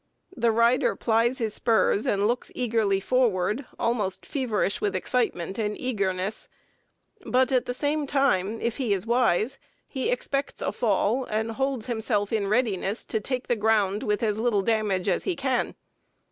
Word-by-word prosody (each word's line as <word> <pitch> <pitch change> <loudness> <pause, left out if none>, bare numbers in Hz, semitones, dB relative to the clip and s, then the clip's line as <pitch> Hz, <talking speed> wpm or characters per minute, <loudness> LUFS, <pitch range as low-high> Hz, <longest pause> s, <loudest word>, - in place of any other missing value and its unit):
The 235 -1 +2
rider 235 +4 +3
plies 230 +2 +1
his 225 -4 -1
spurs 220 -2 +2
and 200 0 +2
looks 240 +2 -1
eagerly 225 -5 +1
forward, 225 +1 +1
almost 210 -5 -1
feverish 235 -8 -1
with 205 -2 0
excitement 195 -3 -1
and 210 -1 -2
eagerness, 200 -5 -2 0.8
but 260 -2 +2
at 255 -2 +2
the 245 - -1
same 295 +1 -1
time 230 -7 +1
if 235 -1 -1
he 240 -7 +1
is 190 +1 -4
wise 240 +1 +1 0.3
he 265 -3 -2
expects 275 +3 -2
a - - -1
fall, 230 +3 +1
and 220 +1 -2
holds 265 -1 -2
himself 220 -3 -1
in 205 -3 0
readiness 210 -2 0
to 220 - -1
take 250 +4 -3
the 240 - +1
ground 210 -2 +2
with 210 +1 -1
as 215 -1 0
little 220 -4 +1
damage 210 -4 0
as 185 - +1
he 370 - 0
can. 265 -4 -1
225 Hz, 160 wpm, -26 LUFS, 205-250 Hz, 0.8 s, rider